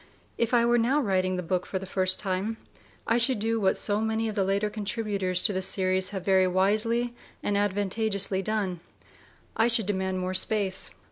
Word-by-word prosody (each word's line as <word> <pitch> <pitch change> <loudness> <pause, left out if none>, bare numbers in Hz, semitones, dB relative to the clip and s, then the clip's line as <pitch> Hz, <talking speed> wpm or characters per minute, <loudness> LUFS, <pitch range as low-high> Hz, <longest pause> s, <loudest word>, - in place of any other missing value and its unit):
If 235 -1 -1
I 235 -1 +3
were 240 0 +3
now 255 +6 +2
writing 185 -6 0
the 180 - -3
book 180 +2 -2
for 190 - -3
the 190 - -6
first 185 0 +1
time, 195 +3 -2 0.5
I 230 +1 +2
should 240 +1 +4
do 225 +2 -1
what 190 -1 +2
so 205 0 0
many 220 0 -1
of 215 - -3
the 200 -2 0
later 200 +2 0
contributors 205 -3 0
to 210 - +5
the 190 - -2
series 185 0 +1
have 190 -3 -6
very 190 -1 +3
wisely 215 +6 +1 0.3
and 205 - 0
advantageously 200 -1 0
done: 195 -3 -2 0.8
I 225 - +3
should 230 -3 +3
demand 190 -1 -2
more 185 0 -3
space. 195 0 0
200 Hz, 190 wpm, -26 LUFS, 185-220 Hz, 0.8 s, to